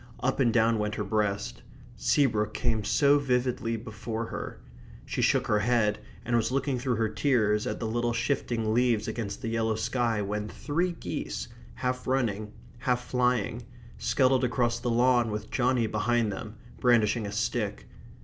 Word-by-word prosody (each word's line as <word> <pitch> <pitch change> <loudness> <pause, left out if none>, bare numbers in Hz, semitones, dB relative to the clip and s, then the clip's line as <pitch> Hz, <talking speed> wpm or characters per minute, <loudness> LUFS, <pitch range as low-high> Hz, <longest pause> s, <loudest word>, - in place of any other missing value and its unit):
Up 135 +2 0
and 120 -4 +4
down 115 -1 +3
went 105 0 -1
her 105 - -2
breast. 100 - -1 0.3
Seabrook 110 -7 +1
came 115 -3 0
so 145 +5 +4
vividly 125 -3 0
before 110 0 -5
her. - - -6 0.5
She - - -2
shook - - +3
her 105 - +2
head 105 -2 +2 0.3
and 120 - 0
was 115 +1 +1
looking 135 -1 0
through 125 -1 0
her 110 0 +1
tears 110 -4 +1
at - - -3
the 115 - -3
little 120 +2 0
shifting 115 -2 -1
leaves 120 -3 +2
against 110 -3 -4
the - - -2
yellow 115 -1 0
sky 115 0 0
when 105 +1 -3
three 170 +8 -1
geese, - - -5 0.3
half 125 0 -2
running, 110 -5 0 0.3
half 125 0 0
flying, 125 -2 0 0.4
scuttled 130 -1 +3
across 120 -1 +1
the 120 - -2
lawn 120 0 +3
with 105 0 -5
Johnny 125 -2 +2
behind 110 +1 +1
them, 105 +2 -7 0.2
brandishing 115 -2 +3
a - - -5
stick. 105 - -2
115 Hz, 160 wpm, -28 LUFS, 105-125 Hz, 0.5 s, and